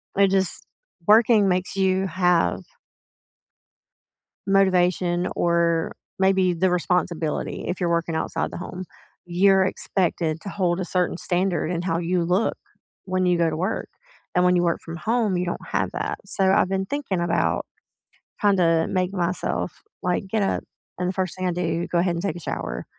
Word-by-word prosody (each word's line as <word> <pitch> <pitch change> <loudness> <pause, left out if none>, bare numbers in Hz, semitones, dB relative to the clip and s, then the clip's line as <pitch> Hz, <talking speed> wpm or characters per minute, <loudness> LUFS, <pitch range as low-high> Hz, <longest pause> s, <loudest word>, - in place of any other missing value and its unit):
It 200 0 +5
just 190 -2 0 0.4
working 215 -1 +5
makes 180 +1 -1
you 190 0 +2
have 180 -2 +2 1.9
motivation 180 -2 +2
or, 170 -1 +1 0.3
maybe 190 -1 +3
the 180 +2 +1
responsibility, 175 -3 -1
if 180 - -2
you're 175 - 0
working 170 -1 0
outside 160 - -2
the - - -7
home, 180 +1 -6 0.4
you're 190 +2 +4
expected 170 -4 -1
to 200 - -8
hold 185 -2 0
a - - -1
certain 180 -1 0
standard 175 -2 0
in 170 -2 -1
how 170 -2 -1
you 175 0 0
look, 180 +6 +1 0.5
when 185 -1 0
you 180 -1 +2
go 170 -1 +3
to 155 - -2
work, 185 +7 -2 0.5
and 180 - +3
when 180 0 +4
you 175 - +3
work 170 -1 0
from 165 0 -6
home, 220 0 0
you 180 - 0
don't 175 - -4
have - - -1
that, - - -3
so 190 -2 +1
I've 190 -1 +3
been 190 0 -1
thinking 270 -8 -2
about 170 -1 0 0.8
kinda 175 -5 +3
make 185 0 0
myself, 180 -1 -2 0.2
like, 180 +2 -1
get 215 +2 0
up, 195 - 0 0.3
and 180 - -1
the - - -2
first 185 -2 -2
thing 185 0 -1
I - - +1
do, 170 -1 -1
go 175 - 0
ahead 175 0 +1
and 170 - -4
take 200 - -1
a - - -7
shower - - -4
180 Hz, 170 wpm, -24 LUFS, 170-190 Hz, 1.9 s, It